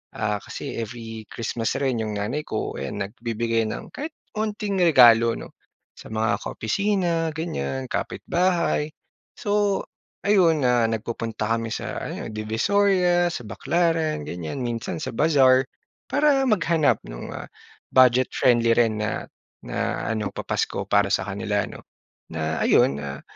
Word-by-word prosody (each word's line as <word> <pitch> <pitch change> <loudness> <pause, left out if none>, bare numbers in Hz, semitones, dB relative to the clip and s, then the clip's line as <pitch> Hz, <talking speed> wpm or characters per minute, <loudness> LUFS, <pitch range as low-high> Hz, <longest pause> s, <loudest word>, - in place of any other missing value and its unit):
ah, 105 -1 -1
kasi - - -6
every 115 -1 -6
Christmas 115 0 -2
rin 130 -4 0
'yong 105 -1 -3
nanay 125 +9 -2
ko, - - -3
ayan 70 0 -4
nagbibigay 115 +2 -1
ng - - -6
kahit 305 +2 -5 0.2
onting 210 -1 -2
regalo 120 -8 +7
'no - - -9 0.4
sa - - -12
mga 110 +1 0
ka-opisina 170 - 0
ganyan, 70 - -3
kapit-bahay. 170 -4 0 0.5
So 205 -1 +1 0.4
ayon, 170 -7 +4
ah, 120 -2 +3
nagpupunta 115 0 -3
kami 115 0 -3
sa - - -4
ano, - - -5
Divisoria, 175 - +2
sa 125 - -5
Baclaran 160 +2 0
ganyan, 85 - -5
minsan 115 -1 -3
sa 155 - -4
bazaar 135 -4 +5 0.5
para 285 -2 +3
maghanap 170 - +2
no'ng, - - -7
ah, - - -7 0.5
budget-friendly 125 -2 +4
rin 115 -3 +2
na 105 - -2 0.4
na - - -2
ano, 105 -3 -1
papasko - - -2
para 100 -1 +4
sa 95 - +2
kanila 100 +1 -1
'no. - - -10 0.5
Na 80 0 -2
ayon, 70 - +4
ah, 70 -1 -6
120 Hz, 130 wpm, -24 LUFS, 110-170 Hz, 0.5 s, regalo